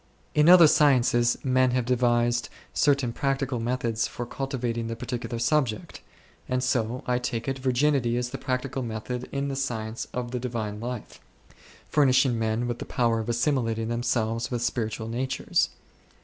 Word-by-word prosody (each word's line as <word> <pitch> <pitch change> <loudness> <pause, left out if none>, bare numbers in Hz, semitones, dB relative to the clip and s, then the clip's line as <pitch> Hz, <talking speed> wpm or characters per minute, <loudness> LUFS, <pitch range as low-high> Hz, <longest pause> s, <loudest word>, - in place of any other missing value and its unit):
In 150 +2 +5
other 175 -2 +10
sciences 125 -5 +4
men 130 -1 +3
have 125 - 0
devised 120 -1 +1 0.2
certain 140 -5 +2
practical 135 -2 -1
methods 115 -1 -1
for 120 - -6
cultivating 120 -4 -3
the 115 - -3
particular 120 0 -4
subject; 120 -2 0 0.5
and 125 0 0
so, 125 -1 0
I 125 0 +1
take 120 -1 -3
it, 135 0 -2
virginity 130 -2 +1
is 125 0 -2
the 135 - -5
practical 130 0 -2
method 120 +2 -5
in 140 0 -2
the 135 - -3
science 115 -4 -3
of 125 -1 -4
the 125 - -2
Divine 115 -4 -4
life, 120 0 -6 0.7
furnishing 130 -4 +3
men 110 +2 0
with 120 -1 -3
the - - -5
powqr 115 -2 +1
of 110 - -6
assimilating 115 -3 0
themselves 115 -1 -1
with 120 -2 -2
spiritual 110 -2 -2
natures. 130 +3 0
120 Hz, 155 wpm, -26 LUFS, 115-130 Hz, 0.7 s, other